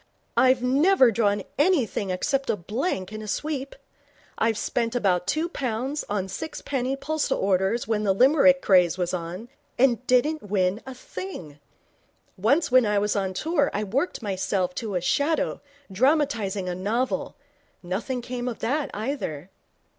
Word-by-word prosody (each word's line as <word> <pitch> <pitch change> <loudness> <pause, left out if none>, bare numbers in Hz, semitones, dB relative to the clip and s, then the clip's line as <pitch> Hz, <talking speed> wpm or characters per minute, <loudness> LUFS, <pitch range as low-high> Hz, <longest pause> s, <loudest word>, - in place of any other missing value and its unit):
I've 255 -1 +4
never 270 +1 +4
drawn 205 -2 +1 0.2
anything 285 - +2
except 275 +9 -1
a - - +2
blank 205 - -3
in 215 - -6
a 215 - -8
sweep. 275 +4 -3 0.6
I 225 - +2
spent 230 +2 -2
about 185 -6 +1
two 310 - 0
pounds 265 -1 -3
on 200 -2 -1
sixpenny 270 - -3
postal 310 +2 -1
orders 195 +4 +1
when 215 -2 0
the 200 - +2
Limerick 275 +5 +5
craze 180 -3 +4
was 180 -1 -1
on, 180 +5 -5 0.3
and 250 -1 +3
didn't 295 +5 +2
win 190 +1 +1
a 260 - -7
thing. 180 - -8 0.8
Once 250 - +2
when 255 -3 +5
I 210 0 +1
was 205 +1 +1
on 190 -2 -1
tour 305 - +1
I 210 - 0
worked 250 - -2
myself 190 -2 -1
to 215 -4 -4
a 180 - 0
shadow, 290 - 0 0.3
dramatizing 225 -5 +1
a 180 - -2
novel. 220 +8 -2 0.5
Nothing 230 +8 -3
came 245 0 -4
of 240 - -3
that, 285 +5 -1
either.' 200 - -4
230 Hz, 150 wpm, -25 LUFS, 195-275 Hz, 0.8 s, Limerick